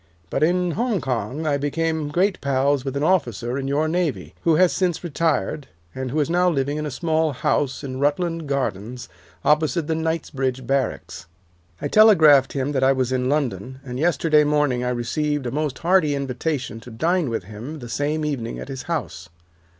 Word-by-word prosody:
But - - -1
in 175 +2 +2
Hong 225 +2 0
Kong 130 +2 -3
I 155 - +1
had 140 -1 0
become 160 +1 -1
great 185 +5 +1
pals 140 0 +1
with 135 0 -3
an 140 - -1
officer 125 - +1
in 135 - -3
your 145 +3 +1
navy, 170 -2 -1
who 165 -2 +3
has 180 +2 +4
since 180 -3 0
retired, 155 - -1 0.3
and 130 -1 -4
who 150 +5 -1
is 150 - +2
now 180 +2 +3
living 145 -2 -1
in 150 0 -2
a - - -3
small 160 +2 0
house 135 +2 -1
in 130 -1 -5
Rutland 165 +2 0
Gardens 125 -3 -3 0.4
opposite 155 +2 +2
the 160 - -1
Knightsbridge 145 -6 -2
barracks. 120 -9 -2 0.5
I - - -2
telegraphed 155 -11 +6
him 140 +1 -1
that 135 -2 0
I 135 +1 +5
was 130 -1 -1
in 130 0 0
London, 130 -4 -2
and 125 -1 -5
yesterday 155 -1 +3
morning 145 -4 +1
I 125 - 0
received 140 +4 -1
a 120 - -2
most 150 -2 -2
hearty 170 -4 +2
invitation 135 -2 -3
to 115 - -12
dine 160 +6 0
with 115 -5 -2
him 110 +10 -8
the 120 -5 -8
same 150 +5 -1
evening 130 -6 -3
at - - -8
his 135 -1 -5
house. 90 - -4
145 Hz, 190 wpm, -22 LUFS, 130-160 Hz, 0.5 s, telegraphed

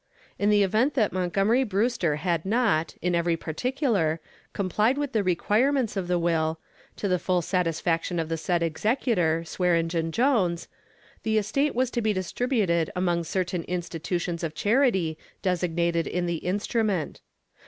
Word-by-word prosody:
In 205 - +2
the 205 -1 +5
event 220 +9 +1
that 220 -6 +2
Montgomery 195 +7 +2
Brewster 205 - 0
had 165 +1 -1
not, 205 -6 +1
in 180 0 +1
every 170 -1 +1
particular, 195 - 0 0.3
complied 210 +6 +1
with 290 -2 -2
the 220 - +1
requirements 220 +8 +1
of 190 -3 -2
the 180 0 +1
will, 165 -2 0 0.4
to 205 - -3
the 180 -2 +1
full 180 0 0
satisfaction 170 -1 0
of 165 -1 -1
the 165 - -1
said 170 +1 0
executor, 170 - +1
Swearengen 165 -1 0
Jones, 195 - +1 0.5
the 220 0 0
estate 250 +8 0
was 255 0 +1
to 240 - -1
be 215 -1 +1
distributed 185 - 0
among 175 -2 0
certain 180 0 -1
institutions 175 0 -3
of 155 -2 -3
charity 205 - +2 0.2
designated 170 -2 0
in 180 0 -1
the 170 -1 -1
instrument. 200 -1 -1
180 Hz, 145 wpm, -26 LUFS, 170-220 Hz, 0.5 s, the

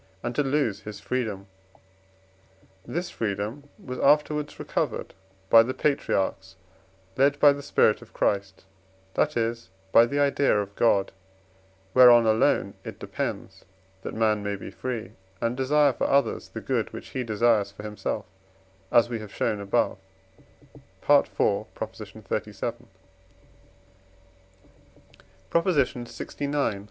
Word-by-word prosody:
and 120 0 -2
to 135 - +1
lose 135 -7 0
his 105 -2 -9
freedom; 110 -4 -3 1.4
this 175 +1 -3
freedom 110 +7 -4
was 125 -1 -7
afterwards 150 +1 +2
recovered - - -3 0.3
by 115 +3 +8
the 130 +3 -2
patriarchs, 95 -9 -1 0.6
led 140 +2 +3
by 145 -1 +7
the 140 - -7
spirit - - +2
of - - -15
Christ; 100 -1 -1 0.5
that 150 -4 +1
is, 115 0 -2 0.2
by 115 +3 +7
the 140 +4 -2
idea 140 -4 +3
of 100 0 -5
God, 100 -4 +2 0.8
whereon 120 -2 +8
alone 110 0 +2
it - - -8
depends, - - -5 0.4
that - - -6
man 110 -1 +2
may 100 0 -2
be 95 - -9
free, 120 -4 -5 0.3
and 115 +4 -1
desire 140 +2 +3
for - - -1
others 140 0 +1
the - - -7
good - - -1
which - - -9
he 130 - -3
desires 110 -2 +2
for 100 +1 -11
himself, 105 0 -4 0.7
as 120 - +5
we 120 -1 -4
have 105 -2 -9
shown 105 0 -1
above 100 0 0 1.1
(IV. - - +6
xxxvii.). - - -3 2.7
PROP. 170 +2 +2
LXIX. 140 - -1
120 Hz, 125 wpm, -26 LUFS, 105-140 Hz, 2.7 s, by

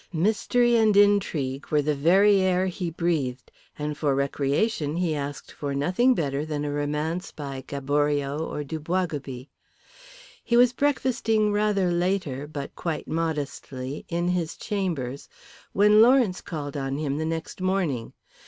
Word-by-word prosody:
Mystery 220 +7 +2
and 215 -3 +4
intrigue 170 -10 +2
were 150 -1 +2
the 150 +1 +1
very 190 +8 +4
air 185 0 +2
he 180 -1 -3
breathed, 155 -7 -2 0.3
and 150 0 -3
for 145 -2 0
recreation 145 +4 0
he 175 -3 0
asked 145 -1 -5
for 140 -1 -4
nothing 185 - +3
better 140 -4 -1
than 150 -1 -3
a 145 - -2
romance 150 +5 -2
by 135 -3 -6
Gaboriau 145 +1 0
or 155 -2 -3
Du 155 +3 -5
Boisgobey. 150 -6 -3 1.0
He 235 - +2
was 245 0 +5
breakfasting 245 -6 +1
rather 205 -3 +1
later, 175 -6 -1
but 145 -2 -6
quite 165 -3 -4
modestly, 145 -4 -3
in 175 +1 0
his 175 -3 -1
chambers 165 - -3 0.4
when 210 +2 +5
Lawrence 240 -6 +4
called 145 -4 -6
on 135 -1 -2
him 145 -1 -2
the - - -1
next 165 +3 -4
morning. 180 -11 -1
160 Hz, 145 wpm, -25 LUFS, 145-195 Hz, 1.0 s, was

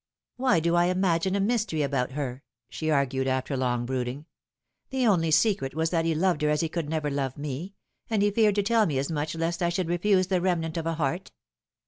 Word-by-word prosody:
" - - -66
Why 250 -8 +2
do 170 +2 +1
I 175 0 +4
imagine 185 0 +1
a - - +1
mystery 205 -7 0
about 135 -2 -1
her 135 -3 -4
?" 115 0 -61
she 160 - -3
argued, 135 -2 +1
after 130 +1 -1
long 125 -2 0
brooding. 130 +3 -3 0.3
" - - -55
The 265 -2 0
only 175 -7 +3
secret 155 -4 +2
was 160 +1 0
that 165 -2 +1
he 165 -1 +1
loved 175 -1 +1
her 150 - +2
as 150 0 +1
he 165 - -1
could 160 -2 -3
never 155 -2 -1
love 135 -1 -2
me, 150 +7 -5 0.3
and 215 -3 +1
he 205 - +3
feared 210 -1 +3
to 205 - +2
tell 225 +1 +3
me 145 -5 -1
as 140 +4 -1
much 155 +1 -2
lest 165 +1 -2
I 175 - +2
should 175 0 -2
refuse 185 +2 +2
the 185 -1 0
remnant 165 -3 0
of 165 -1 -2
a 165 - -1
heart. 165 +5 -2
165 Hz, 235 wpm, -27 LUFS, 140-185 Hz, 0.3 s, I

